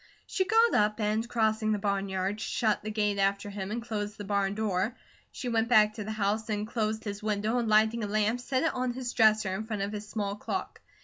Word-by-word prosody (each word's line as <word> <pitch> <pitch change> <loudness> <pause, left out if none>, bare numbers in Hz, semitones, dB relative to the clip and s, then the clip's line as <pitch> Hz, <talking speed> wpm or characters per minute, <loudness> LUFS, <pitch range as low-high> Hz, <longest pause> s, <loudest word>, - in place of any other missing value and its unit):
She 375 - 0
got 455 +2 +4
up 210 +1 +2
and 215 +2 0
crossing 220 -2 +1
the - - 0
barnyard 200 0 -1
shut 225 -4 0
the 215 - -5
gate 210 -2 0
after 200 +1 0
him, 195 -1 -5
and 230 +2 -3
closed 210 -2 -4
the 205 - -6
barn 200 0 0
door. 215 +2 -1 0.3
She 255 - -6
went 230 -1 +1
back 215 -3 +5
to 215 - -5
the 215 - -5
house 215 +1 -1
and 210 -1 -1
closed 220 -1 -2
his 205 -1 -5
window 215 +2 0
and 235 - -1
lighting 220 +2 +3
a - - -1
lamp 215 +3 +1
set 260 +3 -1
it 325 - +1
on 255 -1 -1
his 250 -1 -4
dresser 215 -4 +4
in 215 +3 -4
front 215 -3 -2
of 200 - -3
his 210 0 -6
small 205 -2 -2
clock. 375 - -4
215 Hz, 230 wpm, -29 LUFS, 205-225 Hz, 0.3 s, back